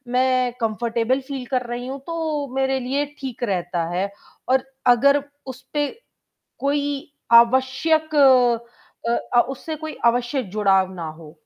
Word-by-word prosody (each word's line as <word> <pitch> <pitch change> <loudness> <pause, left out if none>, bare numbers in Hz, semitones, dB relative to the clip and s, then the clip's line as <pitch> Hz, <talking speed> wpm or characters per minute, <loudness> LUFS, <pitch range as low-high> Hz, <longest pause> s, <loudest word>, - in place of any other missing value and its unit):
मैं 255 -1 +2
comfortable 230 +3 0
feel 265 -3 -4
कर 250 -1 0
रही 240 +1 -5
हूँ, 270 +1 -5
तो 310 -1 -3
मेरे 265 0 +1
लिए 275 +3 -1
ठीक 255 -3 -6
रहता 175 -4 -1
है 195 +2 0 0.4
और 265 0 +3 0.3
अगर 280 +3 +3 0.2
उस 260 0 -8
पे 290 -1 +1 0.7
कोई 285 +1 -1 0.2
आवश्यक 265 +6 +4
अ 245 -4 +2 0.3
अ, - - +8
उससे 310 +4 -5
कोई 315 0 -7
आवश्यक 240 -1 +1
जुड़ाव 195 -3 +2
ना 170 -3 -5
हो। 155 +1 -13
255 Hz, 135 wpm, -22 LUFS, 235-280 Hz, 0.7 s, अ